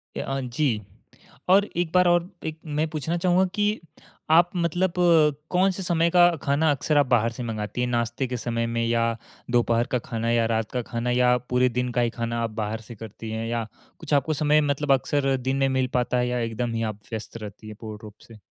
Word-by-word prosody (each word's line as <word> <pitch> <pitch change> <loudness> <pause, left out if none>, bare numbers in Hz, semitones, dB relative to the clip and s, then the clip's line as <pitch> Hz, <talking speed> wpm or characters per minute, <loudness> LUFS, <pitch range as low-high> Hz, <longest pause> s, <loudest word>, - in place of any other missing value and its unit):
ए, - - -3
अ, 135 0 -3
जी। 125 -3 -1 0.7
और 200 +2 +6
एक 175 -2 0
बार 180 0 +5
और 175 0 +2 0.2
एक 160 0 -5 0.2
मैं 160 +1 +1
पूछना 160 +3 -2
चाहुँगा 180 +2 +3
कि 210 +1 +1 0.6
आप 175 0 +5
मतलब 175 +1 0 0.6
कौन 185 +2 +3
से 190 +1 -6
समय 170 -1 +2
का 175 -1 +6
खाना 145 +2 +2
अक्सर 145 +2 0
आप 145 - +5
बाहर 115 -2 +2
से 120 +2 -6
मँगाती 110 0 -4
हैं? 125 - +1
नाश्ते 120 +2 -1
के 125 0 -3
समय 115 -1 -2
में 115 0 -1
या 115 0 +1 0.5
दोपहर 120 0 +2
का 125 - +2
खाना 115 0 -1
या 115 -1 +3
रात 110 -1 -1
का 125 - -1
खाना 120 +1 -1
या 125 0 +4
पूरे 125 0 +3
दिन 125 0 -1
का 120 - +1
ही 120 - +2
खाना 115 0 -1
आप 115 - -1
बाहर 110 +2 -3
से 120 - -8
करती 110 +1 -9
हैं 110 +1 -3
या 115 -1 -2 0.3
कुछ 155 -2 -4
आपको 145 +2 +2
समय 150 +1 +3
मतलब 145 0 -1
अक्सर 135 +1 +1
दिन 135 +1 +1
में 135 0 +2
मिल 130 - +1
पाता 125 0 +1
है 125 0 +1
या 125 0 -1
एकदम 115 +1 -2
ही 115 0 -1
आप 105 - -14
व्यस्त 110 +1 -6
रहती 105 0 -9
है 110 - -7
पूर्ण 110 -2 -8
रूप 105 -1 -10
से? 115 -2 -13
125 Hz, 225 wpm, -25 LUFS, 115-155 Hz, 0.7 s, और